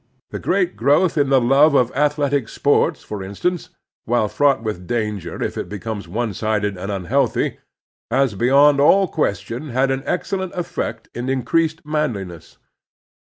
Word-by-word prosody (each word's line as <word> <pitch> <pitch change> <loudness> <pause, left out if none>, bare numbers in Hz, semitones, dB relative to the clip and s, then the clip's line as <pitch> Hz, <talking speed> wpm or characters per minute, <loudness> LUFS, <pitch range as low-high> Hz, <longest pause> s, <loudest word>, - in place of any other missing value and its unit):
The - - -5
great 180 -2 0
growth 145 +9 +2
in 145 -3 +2
the 135 -1 +5
love 140 +5 +4
of 125 -2 +3
athletic 145 -4 +1
sports, 145 - +1
for 105 -2 -6
instance, 130 - -3 0.4
while 120 -2 +1
fraught 135 0 +2
with 90 -5 -5
danger 105 -6 -3
if - - -3
it - - -5
becomes 105 -1 -5
one 110 +4 -2
sided 105 0 -1
and 95 +3 -5
unhealthy, 95 -3 0 0.5
has 130 0 +2
beyond 140 +7 +4
all 190 +7 +5
question 140 - -3
had 130 +2 +1
an 135 0 -1
excel 190 +2 -1
lent 185 -1 -5
eflEect 175 -1 -4
in 120 +2 -4
increased 160 +5 0
manliness. 110 - -4
130 Hz, 155 wpm, -20 LUFS, 105-150 Hz, 0.5 s, the